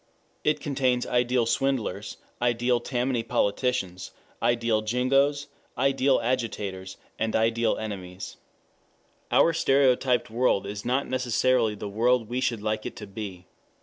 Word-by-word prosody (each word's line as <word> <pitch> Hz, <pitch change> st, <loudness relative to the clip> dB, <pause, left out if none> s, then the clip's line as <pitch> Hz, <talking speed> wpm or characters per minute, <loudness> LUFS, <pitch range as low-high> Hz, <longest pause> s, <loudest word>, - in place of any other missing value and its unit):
It 150 Hz, 0 st, +2 dB
contains 130 Hz, -4 st, 0 dB
ideal 125 Hz, -1 st, +1 dB
swindlers, 115 Hz, -6 st, -1 dB, 0.2 s
ideal 120 Hz, 0 st, +2 dB
Tammany 125 Hz, -1 st, -1 dB
politicians, 105 Hz, -4 st, -1 dB, 0.3 s
ideal 115 Hz, -2 st, +2 dB
jingoes, 135 Hz, +5 st, +1 dB, 0.3 s
ideal 135 Hz, +1 st, +3 dB
agitators, 105 Hz, -6 st, -3 dB, 0.2 s
ideal 115 Hz, +1 st, +1 dB
enemies. 95 Hz, -4 st, -6 dB, 0.9 s
Our 165 Hz, -, +4 dB
stereotyped 130 Hz, -5 st, +2 dB
world 120 Hz, -4 st, +2 dB
is 100 Hz, +1 st, -5 dB
not 130 Hz, +3 st, +1 dB
necessarily 125 Hz, -2 st, +1 dB
the 105 Hz, -, -6 dB
world 115 Hz, +3 st, +1 dB
we 125 Hz, +1 st, -2 dB
should 115 Hz, -5 st, -1 dB
like 110 Hz, 0 st, -1 dB
it -, -, -8 dB
to 105 Hz, -, -8 dB
be. 95 Hz, -3 st, -7 dB
120 Hz, 115 wpm, -26 LUFS, 110-130 Hz, 0.9 s, Our